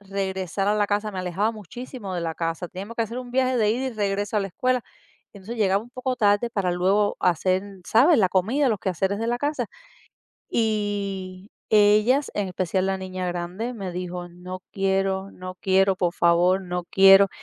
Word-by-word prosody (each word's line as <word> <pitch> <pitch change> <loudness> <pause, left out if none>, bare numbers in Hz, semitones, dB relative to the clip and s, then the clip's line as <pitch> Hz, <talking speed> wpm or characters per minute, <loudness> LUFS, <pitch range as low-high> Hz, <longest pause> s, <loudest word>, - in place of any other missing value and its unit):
regresar 195 -1 -2
a 210 - +3
la 205 -1 +2
casa, 210 +1 0
me 190 - -5
alejaba 185 +5 0
muchísimo 215 - -8
de 175 - -2
la 165 -1 -2
casa. 165 +1 -3
Teníamos 200 +5 -8
que 230 - +2
hacer 230 +3 -5
un 250 -1 -7
viaje 255 0 +2
de 215 -2 +3
ida 255 +4 -1
y 255 - -6
regreso 205 0 -1
a - - +3
la 195 - -2
escuela, 255 +6 0 0.5
entonces, 205 +4 -8
llegaba 195 -1 +2
un 240 - -15
poco 255 0 -2
tarde 210 +1 +2
para 195 -5 0
luego 195 +4 +2
hacer, 185 +1 +2 0.3
¿sabes?, 270 +6 +5
la 190 -3 +4
comida, 230 +10 +1
los 215 -4 0
quehaceres 190 +2 -1
de 230 - -2
la 240 - +1
casa. 290 +3 -1 0.8
Y, 200 -3 -2 0.2
ellas, 215 +6 +4
en 200 -2 -1
especial 185 +1 -1
la 195 0 0
niña 185 -1 -4
grande, 180 +8 -4
me 190 -5 -5
dijo: 180 0 -5
"No 180 +1 -8
quiero, 195 0 0
no 185 0 -8
quiero, 190 0 +2
por 175 -2 0
favor, 175 +3 +3
no 180 -1 -4
quiero", 195 +1 +7
195 Hz, 190 wpm, -24 LUFS, 185-220 Hz, 0.8 s, quiero